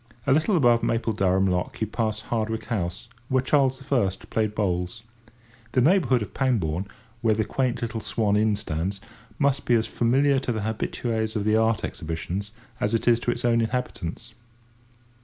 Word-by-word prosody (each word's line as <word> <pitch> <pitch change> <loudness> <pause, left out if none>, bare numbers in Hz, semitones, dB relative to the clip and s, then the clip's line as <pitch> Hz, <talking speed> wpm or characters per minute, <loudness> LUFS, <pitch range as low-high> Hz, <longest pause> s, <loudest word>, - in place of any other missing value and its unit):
A 130 - +4
little 160 +7 +3
above 120 -5 +4
Mapledurham 100 -5 +1
lock 90 -1 -1
you 110 - +1
pass 110 0 -2
Hardwick 110 0 -2
House, 95 -2 -3 0.2
where 130 -1 +2
Charles 130 -1 +2
I. 120 -8 +3 0.2
played 110 -1 0
bowls. 90 0 -1 0.7
The 130 - +3
neighbourhood 135 - +3
of 100 - -10
Pangbourne, 100 - 0 0.3
where 110 -2 +3
the 110 0 0
quaint 130 -3 -1
little 115 -1 -3
Swan 105 -3 0
Inn 105 0 +3
stands, 95 -1 -3 0.4
must 140 -1 +1
be 120 - +4
as 110 -1 +2
familiar 135 +4 +2
to 130 - -2
the 110 -2 -2
habitues 110 +1 -2
of 105 - 0
the 110 +1 +2
Art 110 0 +2
Exhibitions 85 +5 -4 0.3
as 105 +2 +1
it 115 - -2
is 120 -1 +5
to 120 - -2
its 120 0 -4
own 115 -1 +3
inhabitants. 115 -3 -3
110 Hz, 170 wpm, -25 LUFS, 105-125 Hz, 0.7 s, is